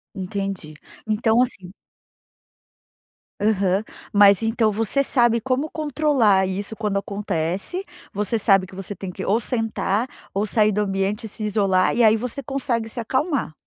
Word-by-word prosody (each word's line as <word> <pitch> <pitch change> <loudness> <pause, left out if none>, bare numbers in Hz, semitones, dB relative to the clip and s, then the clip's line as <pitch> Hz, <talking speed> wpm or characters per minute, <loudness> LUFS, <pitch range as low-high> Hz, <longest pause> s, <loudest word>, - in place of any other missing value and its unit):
Entendi. 195 -4 -4 0.3
Então 220 +2 +2
assim 195 -8 -3 1.7
Aham. 200 -2 +1 0.3
Mas 200 0 +6
então 225 -1 +2
você 225 +6 0
sabe 240 -4 +2
como 260 +5 -1
controlar 285 -11 +2
isso 200 +3 -4
quando 210 -2 -1
acontece, 200 - -3 0.3
você 210 +3 -1
sabe 195 -3 +3
que 185 - -13
você 195 +1 -6
tem 190 +1 -6
que 190 +1 -6
ou 210 +4 +2
sentar 225 -1 -1 0.3
ou 200 +2 0
sair 215 0 +2
do 210 +1 0
ambiente 195 +2 -1
e - - -6
se 215 - -7
isolar 195 -3 +2
e 240 - +3
aí 220 -1 +6
você 250 +4 -5
consegue 255 -5 -2
se 225 - -7
acalmar. 260 - -1
210 Hz, 150 wpm, -22 LUFS, 195-235 Hz, 1.7 s, Mas